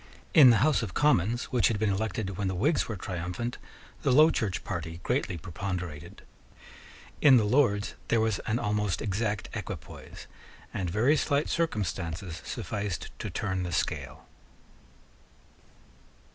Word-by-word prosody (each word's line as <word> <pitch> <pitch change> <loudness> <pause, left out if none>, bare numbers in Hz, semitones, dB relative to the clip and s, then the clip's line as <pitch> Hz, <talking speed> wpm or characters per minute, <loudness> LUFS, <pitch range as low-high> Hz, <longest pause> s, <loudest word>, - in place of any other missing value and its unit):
In 140 -5 +9
the 120 - +6
House 155 -4 +3
of 105 -6 -5
Commons, 120 -5 +2
which 120 -7 +4
had 110 - 0
been 105 -1 +1
elected 100 -1 -2
when 100 +1 -2
the 95 - -1
Whigs 145 - +1
were 110 - -4
triumphant, 90 +6 -4 0.4
the 140 - +2
Low 155 +5 +7
Church 100 -7 -2
party 85 -1 -5
greatly 120 -8 -1
preponderated. 85 -2 -6 1.0
In 135 -4 +8
the 115 - +3
Lords 105 -3 +2
there 115 - +2
was 110 -2 +1
an 115 - +1
almost 105 -4 -1
exact 105 -1 -2
equipoise; - - -8 0.5
and 90 -2 -2
very 115 - +3
slight 145 0 +1
circumstances 90 - -2
sufficed 100 -3 -4
to - - -4
turn 95 -2 -2
the 90 -1 -3
scale. - - -3
105 Hz, 140 wpm, -28 LUFS, 90-120 Hz, 1.0 s, In